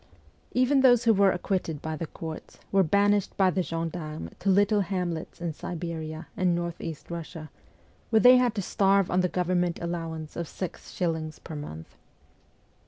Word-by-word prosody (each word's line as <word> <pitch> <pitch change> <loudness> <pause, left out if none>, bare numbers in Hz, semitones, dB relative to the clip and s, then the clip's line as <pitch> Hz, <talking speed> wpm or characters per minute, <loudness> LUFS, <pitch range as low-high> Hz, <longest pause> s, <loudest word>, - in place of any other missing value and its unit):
Even 260 +2 +3
those 245 -2 +6
who 230 -2 +5
were 200 -1 +5
acquitted 175 -4 -2
by 160 +1 -4
the 165 +1 -4
courts 160 0 -8
were 195 - +5
banished 200 +3 +2
by 190 -2 +4
the 185 - 0
gendarmes 165 - -4
to 200 - 0
little 205 +2 +4
hamlets 180 -4 -3
in 170 -2 -3
Siberia 160 -1 -5
and 185 -4 +2
North 170 -1 -3
east 160 -3 -7
Eussia, 165 -2 -7 0.6
where 220 - +5
they 250 +2 +8
had 245 -3 +2
to 200 - -2
starve 195 0 +2
on 180 - +3
the 180 - +1
government 180 -1 0
allowance 165 -2 -4
of 170 -1 -3
six 185 +1 -7
shillings 160 -3 -2
per 160 - -9
month. 80 - -8
175 Hz, 170 wpm, -27 LUFS, 160-195 Hz, 0.6 s, they